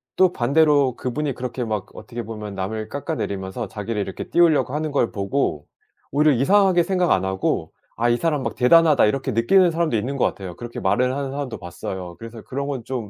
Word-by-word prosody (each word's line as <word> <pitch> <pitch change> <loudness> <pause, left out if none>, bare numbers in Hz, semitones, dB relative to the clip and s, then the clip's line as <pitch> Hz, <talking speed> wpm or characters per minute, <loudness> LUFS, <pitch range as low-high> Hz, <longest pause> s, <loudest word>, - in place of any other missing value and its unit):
또 185 -1 +4
반대로 140 -1 +3
그분이 140 +3 -2
그렇게 125 0 -4
막 105 -3 -3
어떻게 120 -1 -7
보면 105 -2 -7
남을 110 +3 -4
깎아내리면서 110 - -4
자기를 105 +1 -4
이렇게 95 -1 -5
띄우려고 160 -6 +3
하는 155 0 -2
걸 130 -5 +1
보고 100 - -1 0.5
오히려 150 +2 +4
이상하게 185 - +4
생각 180 -1 +1
안 - - +2
하고 95 0 -1 0.2
'아 120 +1 +1
이 120 - +3
사람 150 -3 0
막 - - -2
대단하다.' 150 0 +5
이렇게 135 +4 -1
느끼는 170 - +4
사람도 165 -8 0
있는 130 +6 -3
것 - - +2
같아요. 90 -3 -4
그렇게 120 +2 -7
말을 125 +6 +1
하는 140 -1 -3
사람도 140 -3 -4
봤어요. 90 +1 -7
그래서 115 -1 -9
그런 140 +2 -4
건 135 -5 -4
좀 120 -5 -5
125 Hz, 435 characters per minute, -22 LUFS, 110-150 Hz, 0.5 s, 대단하다